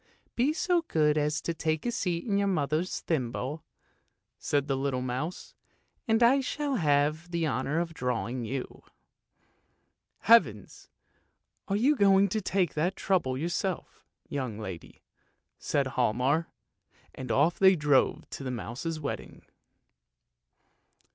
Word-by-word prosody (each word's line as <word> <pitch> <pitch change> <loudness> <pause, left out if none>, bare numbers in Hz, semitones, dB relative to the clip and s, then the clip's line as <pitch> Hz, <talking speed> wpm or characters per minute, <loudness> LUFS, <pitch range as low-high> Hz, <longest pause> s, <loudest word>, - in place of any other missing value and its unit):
"Be 255 +5 +2
so 350 +2 +1
good 150 -2 +2
as 150 +1 0
to 170 - -2
take 155 -1 -2
a 240 - 0
seat 175 -6 -2
in 200 -4 +1
your 200 - +1
mother's 155 -1 -1
thimble," 135 0 -3 0.8
said 145 -1 0
the 135 - 0
little 135 -1 -1
mouse, 130 +8 -4 0.3
" - - -45
and 225 +1 +3
I 255 +4 +5
shall 280 0 -2
have 150 +1 +1
the 170 -1 -1
honour 140 +3 -1
of 170 -1 -3
drawing 125 -2 -2
you! 125 +3 -5 0.5
" - - -42
" - - -49
Heavens! 140 - +3 0.8
are 195 - 0
you 260 +8 +3
going 200 -3 +4
to 215 +3 -1
take 185 -2 0
that 175 +5 0
trouble 165 -10 0
yourself, 175 +4 -3 0.2
young 130 -7 -4
lady? 95 -7 -8 0.3
" - - -50
said 140 -1 0
Hialmar, 130 +5 +1 0.7
and 130 - -6
off 155 +5 +2
they 190 0 +7
drove 150 -4 +2
to - - -6
the 130 - -3
mouse's 130 +7 -4
wedding. 145 - -6
155 Hz, 140 wpm, -28 LUFS, 130-190 Hz, 0.8 s, they